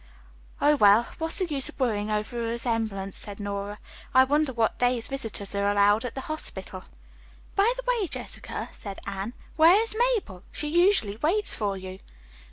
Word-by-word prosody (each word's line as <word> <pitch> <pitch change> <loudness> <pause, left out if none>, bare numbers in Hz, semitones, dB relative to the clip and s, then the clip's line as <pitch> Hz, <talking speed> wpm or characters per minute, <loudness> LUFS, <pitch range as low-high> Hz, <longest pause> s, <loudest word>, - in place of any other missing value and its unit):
"Oh, 295 +1 +4
well, 210 0 +6
what's 325 0 0
the 375 - +1
use 285 -6 -3
of - - -14
worrying 215 -5 0
over 215 +3 -2
a 230 -1 -2
resemblance," 225 -5 -2
said 205 0 -7
Nora. 200 0 -4 0.4
"I 260 - +8
wonder 290 +1 +1
what 230 -3 0
days 245 -2 +1
visitors 225 -7 -2
are 200 0 +1
allowed 205 +3 +3
at 245 - -5
the 265 - -4
hospital." 310 +3 -5 0.7
"By 410 +4 +4
the - - -5
way, 480 -6 +1
Jessica," - - -6
said 200 -3 -8
Anne, 200 +3 -4 0.2
"where 325 +3 +7
is 455 -1 -1
Mabel! 295 - -2
She 300 - -4
usually 345 - +3
waits 365 - +3
for 200 -3 -2
you." 185 0 -8
235 Hz, 175 wpm, -26 LUFS, 205-305 Hz, 0.7 s, I